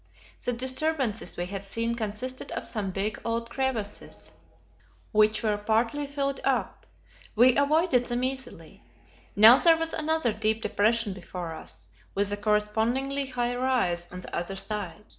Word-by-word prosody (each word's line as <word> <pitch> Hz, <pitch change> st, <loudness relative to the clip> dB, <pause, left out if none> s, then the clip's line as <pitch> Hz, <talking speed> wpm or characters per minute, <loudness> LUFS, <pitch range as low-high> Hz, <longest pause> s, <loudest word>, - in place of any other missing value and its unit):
The -, -, 0 dB
disturbances 260 Hz, -1 st, -1 dB
we 175 Hz, -, -2 dB
had 195 Hz, +1 st, -7 dB
seen 230 Hz, +1 st, 0 dB
consisted 235 Hz, +3 st, -4 dB
of -, -, -4 dB
some 210 Hz, -4 st, -3 dB
big, 200 Hz, +3 st, -3 dB
old 230 Hz, 0 st, -2 dB
crevasses, 235 Hz, -6 st, -4 dB, 0.8 s
which 215 Hz, +1 st, +3 dB
were 210 Hz, -2 st, +1 dB
partly 230 Hz, +7 st, 0 dB
filled 275 Hz, -1 st, -2 dB
up; -, -, -1 dB, 0.5 s
we 245 Hz, +2 st, +6 dB
avoided 280 Hz, -3 st, +2 dB
them 240 Hz, +1 st, -1 dB
easily. 260 Hz, -1 st, -4 dB, 0.5 s
Now 220 Hz, +5 st, +9 dB
there 330 Hz, -1 st, +6 dB
was 325 Hz, 0 st, -1 dB
another 315 Hz, -6 st, +1 dB
deep 220 Hz, +1 st, 0 dB
depression 215 Hz, 0 st, +1 dB
before 180 Hz, -2 st, -7 dB
us; -, -, -9 dB, 0.3 s
with 200 Hz, 0 st, +1 dB
a 205 Hz, -, -1 dB
correspondingly 220 Hz, +7 st, 0 dB
high 245 Hz, -1 st, -1 dB
rise 215 Hz, -10 st, 0 dB
on 180 Hz, 0 st, -7 dB
the -, -, -7 dB
other 175 Hz, +3 st, -3 dB
side. 205 Hz, -2 st, -4 dB
230 Hz, 145 wpm, -27 LUFS, 205-260 Hz, 0.8 s, Now